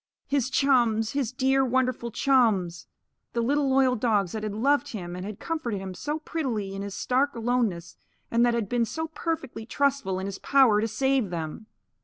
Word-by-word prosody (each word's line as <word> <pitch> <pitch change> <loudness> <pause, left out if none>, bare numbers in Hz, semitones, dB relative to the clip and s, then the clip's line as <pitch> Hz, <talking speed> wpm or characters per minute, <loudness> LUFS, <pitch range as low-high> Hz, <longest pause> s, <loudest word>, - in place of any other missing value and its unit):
His 275 -3 0
chums! 240 -6 +2
His 275 -5 -1
dear, 265 +1 +2
wonderful 255 -2 0
chums! 220 -9 +1 0.5
The 235 - 0
little 280 +3 +1
loyal 265 -1 +3
dogs 210 -6 +1
that 220 - -4
had 210 -1 -4
loved 275 +4 +1
him 175 -4 -5
and 180 - -6
had 205 0 -7
comforted 250 - -3
him 190 -1 -6
so 295 +11 -3
prettily 250 -11 -3
in 195 - -5
his 200 -1 -5
stark 270 +3 0
aloneness 230 -7 -1 0.3
and 235 +1 +3
that 240 -1 +3
had 230 -4 -1
been 240 +2 +1
so 320 +7 -4
perfectly 300 -8 -4
trustful 275 -10 0
in 190 - -3
his 195 -1 -5
power 255 -7 +4
to 225 - 0
save 265 0 +1
them! 170 +5 -5
235 Hz, 185 wpm, -26 LUFS, 205-270 Hz, 0.5 s, power